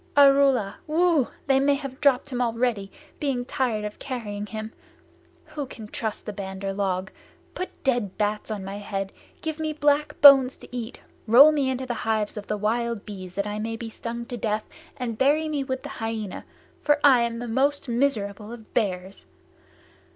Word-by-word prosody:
"Arrula! 275 -7 +5
Whoo! 320 -3 +3 0.2
They 270 -1 +4
may 280 +1 +3
have 275 -1 -7
dropped 280 -1 +3
him 250 -1 -1
already, 230 -4 0 0.3
being 265 -4 -1
tired 235 -5 -1
of 210 - -7
carrying 210 -6 -5
him. 220 +1 -6 0.8
Who 290 -3 -5
can 220 -4 -9
trust 220 -1 -4
the 210 - -5
Bandar 195 0 -5
log? 190 -1 -1 0.4
Put 365 - -7
dead 240 -8 0
bats 210 +1 -1
on 210 -3 -4
my 195 +1 -5
head! 195 -1 -4 0.3
Give 315 -1 -3
me 310 -1 -1
black 295 0 +1
bones 270 -2 +8
to - - -12
eat! 240 0 -5 0.3
Roll 265 +7 +9
me 285 -3 +1
into 260 0 -2
the 245 - -2
hives 220 -1 -1
of 210 -1 -7
the 210 - -1
wild 230 +1 -1
bees 185 -4 -8
that 200 +1 -1
I 210 0 -3
may 225 +1 -3
be 225 0 -7
stung 235 +1 -5
to 245 - -6
death, 215 -1 -2 0.3
and 235 -4 -4
bury 295 +4 +3
me 295 -3 -1
with 260 -1 -4
the - - -6
Hyaena, 225 -3 -4 0.4
for 295 0 +3
I 265 -4 +7
am 235 0 -2
most 280 +3 +1
miserable 225 -4 -1
of 230 -2 -11
bears! 190 -3 -2
235 Hz, 180 wpm, -25 LUFS, 210-275 Hz, 0.8 s, Roll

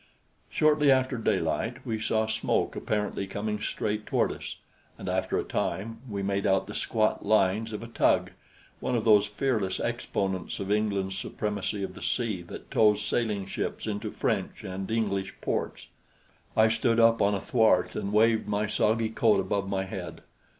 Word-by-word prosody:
Shortly 150 -1 +3
after 130 0 +3
daylight 115 - -1
we 110 -1 -2
saw 110 0 +1
smoke 110 0 0
apparently 105 -2 -2
coming 105 +2 -3
straight 105 0 -2
toward - - +2
us, - - -7 0.4
and - - -8
after - - 0
a - - 0
time 110 +6 -3
we 100 -2 -3
made 100 0 0
out 95 0 +2
the 105 - -8
squat 110 0 0
lines 105 +1 +2
of 105 +1 -5
a - - -7
tug 115 - +2 0.5
one 125 - -1
of 115 -1 0
those 105 -2 +6
fearless 105 -4 -1
exponents 95 -3 -2
of 100 0 -3
England's 100 -3 0
supremacy 105 0 -3
of - - -4
the - - -11
sea 110 -7 -1
that - - -10
tows 105 -1 +4
sailing 105 -5 0
ships 95 - -4
into 105 0 -3
French - - -2
and 95 0 -5
English 100 -4 -1
ports. - - -3 0.7
I 110 0 +6
stood 115 +1 +2
up 115 0 +5
on 100 0 +3
a - - -1
thwart 110 -4 +3
and 100 - -3
waved 110 +1 +3
my 105 0 0
soggy 110 +1 +1
coat 110 -2 +3
above 95 +1 -1
my 95 -1 0
head. - - -7
105 Hz, 170 wpm, -28 LUFS, 100-110 Hz, 0.7 s, those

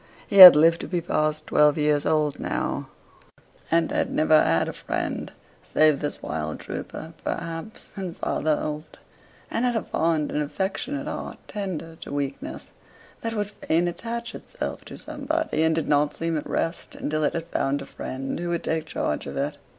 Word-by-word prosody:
He 200 - -1
had 185 -4 +14
lived 165 +2 +5
to - - -5
be 180 - -1
past 155 -2 -1
twelve 150 0 +4
years 150 -1 +2
old 150 -2 +1
now; - - -2 0.8
and 165 0 +2
had - - 0
never 155 0 +4
had 80 +1 +2
a - - -4
friend, - - -3 0.3
save 155 -2 +3
this 145 - -4
wild 75 0 -3
trooper, 160 +1 -7
perhaps, 165 +6 -5
and 185 -4 -5
Father 155 0 0
Holt; 150 +1 -5 0.5
and 230 - 0
had 245 -1 +1
a 225 - 0
fond 160 -2 0
and 150 - 0
affectionate 195 - -3
heart, - - -5
tender 165 -6 -5
to - - -9
weakness, 140 -1 -4 0.5
that 230 0 -3
would 205 -1 -2
fain 175 -4 0
attach 235 +6 -4
itself - - -6
to - - -9
somebody, 305 - -2
and 160 0 +3
did 160 - -1
not 145 0 +2
seem 165 0 -2
at 150 - -4
rest 165 - -2
until 155 +1 -2
it - - +1
had 165 -1 -3
found 140 -2 0
a - - -10
friend 135 +3 -5
who 175 0 -3
would 170 -1 -1
take 160 0 -1
charge 75 - -2
of - - -6
it. - - -2
160 Hz, 180 wpm, -25 LUFS, 150-190 Hz, 0.8 s, had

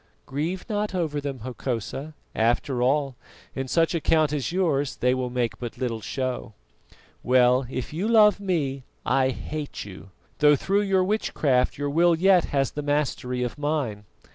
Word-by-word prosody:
"Grieve 160 +7 -3
not 210 -3 -2
over 155 -5 -1
them, 140 -4 -5
Hokosa; 130 +4 -4 0.2
after 120 +3 +1
all, 135 +1 +1 0.4
in 135 0 -4
such 165 +6 +2
a 165 - -1
count 155 -1 +2
as 145 +1 -2
yours 155 -7 0
they 125 +1 +2
will 130 -1 -2
make 120 -2 -2
but 120 -2 -6
little 115 -4 -2
show. 130 -3 -4 0.7
Well, 125 0 +4
if 130 +2 -5
you 180 +7 -1
love 215 -3 +5
me, 150 -9 -1 0.2
I 130 -1 +2
hate 150 +1 -5
you, 95 -1 -11 0.3
though 150 0 +6
through 195 +8 +1
your 195 -2 +2
witchcraft 155 -10 +1
your 145 0 -2
will 170 +3 +4
yet 185 +1 +4
has 135 -2 0
the 150 - -4
mastery 145 -4 -1
of 125 +4 -4
mine. 140 -9 -2
145 Hz, 165 wpm, -25 LUFS, 125-165 Hz, 0.7 s, though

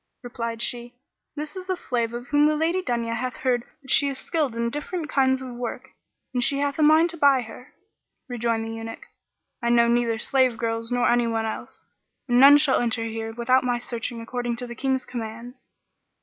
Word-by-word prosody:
Replied 230 -1 -4
she, 240 0 -3 0.4
"This 300 +2 -6
is 370 0 -8
a 370 - +1
slave 240 -8 -2
girl 240 +1 -5
of 245 - -17
whom 295 +1 +4
the 305 - +2
Lady 330 +4 +1
Dunya 235 -6 -2
hath 250 +2 -3
heard 255 -5 0 0.2
that 265 - -7
she 285 - +4
is 275 - -5
skilled 295 -5 -1
in 235 0 -1
different 305 +3 -4
kinds 265 -1 +2
of 255 -1 -7
work 240 -1 -6 0.4
and 250 -1 0
she 275 - +2
hath 285 +1 -1
a - - +3
mind 315 +3 +5
to 340 - -9
buy 280 -3 +4
her." 235 +3 -13 0.5
Rejoined 230 -2 -1
the 225 - -5
Eunuch, 225 0 -7 0.6
"I 235 - 0
know 235 0 +5
neither 235 -1 +1
slave 255 0 +1
girls 230 0 -3
nor 245 0 +2
anyone 230 -2 +1
else; 220 - -6 0.4
and 245 -1 +3
none 280 +2 +9
shall 290 -2 +3
enter 230 -1 0
here 225 0 -4
without 250 +2 +2
my 245 -1 0
searching 235 -1 -4
according 240 +1 -3
to 245 +1 -5
the 240 - -7
King's 260 +2 -1
commands." 235 +2 -8
245 Hz, 205 wpm, -24 LUFS, 230-275 Hz, 0.6 s, none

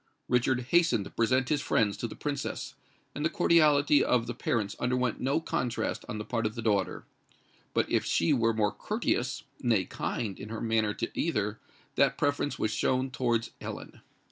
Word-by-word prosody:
Richard 125 +1 +2
hastened 165 - +3
to - - -9
present 125 +2 +1
his 150 -2 +1
friends 105 -3 +1
to 115 - -3
the - - -9
Princess; 145 -1 -4 0.4
and 145 - -4
the 160 - +2
cordiality 150 -4 +4
of 120 -2 +2
the 120 - -4
parents 110 -3 -1
underwent 125 -2 0
no 135 +4 +1
contrast 125 -6 -2
on 110 - -3
the 105 - -5
part 115 -2 0
of 110 - -7
the 115 - -4
daughter;—but 105 -3 -3
if - - +1
she 85 - +2
were 115 -1 +3
more 110 -2 +1
courteous—nay, 110 -6 -1
kind—in 105 -1 -4
her 115 0 -5
manner 110 -2 +1
to - - -3
either, 105 -9 -1 0.4
that - - +3
preference 145 0 0
was 110 - 0
shown 130 +4 0
towards 120 -3 0
Ellen. - - -7
120 Hz, 170 wpm, -29 LUFS, 110-135 Hz, 0.4 s, cordiality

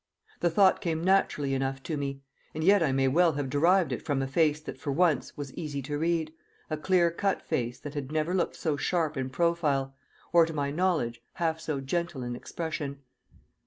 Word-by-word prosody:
The 175 - +2
thought 190 +3 +4
came 165 -1 -1
naturally 175 -7 +2
enough 135 0 -2
to 155 - -3
me. 140 -1 -4 0.3
And 155 - -2
yet 200 +2 +5
I 155 -5 +2
may 135 0 +2
well 165 +4 +4
have 140 -2 -3
derived 170 +4 +3
it - - -3
from 145 -2 0
a - - -2
face 150 +1 +2
that - - -8
for 145 - -3
once 165 +1 +1
was 140 -2 -6
easy 145 -4 -4
to 145 +3 -4
read, 165 -1 0 0.4
a - - +1
clear 175 +1 +3
cut 195 +3 0
face 120 +1 -2
that 145 - -7
had 145 -2 -5
never 155 +3 0
looked 180 -2 0
so 155 -3 -1
sharp 160 -1 0
in 130 -1 -2
profile, 140 -3 0 0.4
or, 170 -1 +6
to 165 - -5
my 140 -2 -1
knowledge, 150 -9 0
half 165 -2 -1
so 155 -3 -3
gentle 165 -1 -2
in 120 0 -4
expression. 145 -1 -5
155 Hz, 200 wpm, -28 LUFS, 135-170 Hz, 0.4 s, or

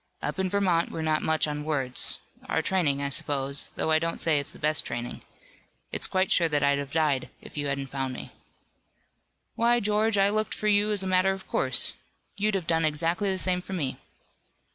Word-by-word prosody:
Up - - -4
in 190 0 +1
Vermont 180 -4 +1
we're 160 - -4
not 155 -1 +1
much 160 -1 +1
on 150 0 -3
words 135 -5 0 0.3
our 160 - +1
training 150 -7 +1
I 140 - -1
suppose, 140 0 0
though 160 - -1
I 155 - +5
don't 165 +1 -3
say 155 -3 +2
it 140 - -5
is - - -5
the - - -14
best 155 0 +2
training. 120 0 -5 0.7
It's - - 0
quite 185 0 0
sure 170 -2 +4
that 145 -2 +1
I'd 140 0 +3
have 140 -1 -5
died 150 -5 +1
if - - -14
you 145 -1 -2
hadn't 140 -1 -3
found 135 -2 -3
me." - - -8 1.2
"Why, 240 +1 +3
George, 210 0 +1
I 195 0 +4
looked 215 0 -1
for 215 - -2
you 205 0 +3
as 205 -2 +2
a - - -3
matter 185 +1 +3
of 190 0 -9
course. - - +3 0.4
You'd 210 0 0
have 185 -4 -2
done 165 0 +1
exactly 165 +6 +1
the 190 - -1
same 185 -1 +1
for 190 - -8
me." 145 -8 -2
165 Hz, 210 wpm, -27 LUFS, 145-190 Hz, 1.2 s, I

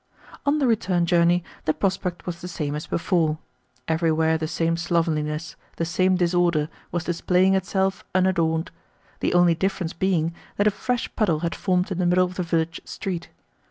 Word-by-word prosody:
On 290 +2 +4
the 285 - +2
return 190 -7 +2
journey 175 0 +3 0.2
the 155 - +1
prospect 190 -2 -2
was 170 -1 -5
the 180 - -6
same 150 -5 -3
as 150 +1 -5
before. 165 -3 +1 0.5
Everywhere 160 0 +2
the 160 0 -2
same 165 +1 0
slovenliness, 165 -2 -1 0.2
the 165 - -1
same 185 +2 +2
disorder, 175 -3 +2 0.2
was 175 -2 -1
displaying 180 +2 +2
itself 190 0 0
unadorned: 170 -3 +1 0.5
the - - 0
only 175 -1 +5
difference 180 0 -2
being 170 -4 0 0.2
that 205 - +2
a 210 - +5
fresh 245 +4 -3
puddle 170 -8 +1
had 170 -1 -1
formed 185 0 0
in 185 - -2
the 180 - +2
middle 180 +1 +4
of 180 - -6
the 180 - -3
village 165 -1 -1
street. 180 -3 -5
175 Hz, 170 wpm, -24 LUFS, 165-185 Hz, 0.5 s, only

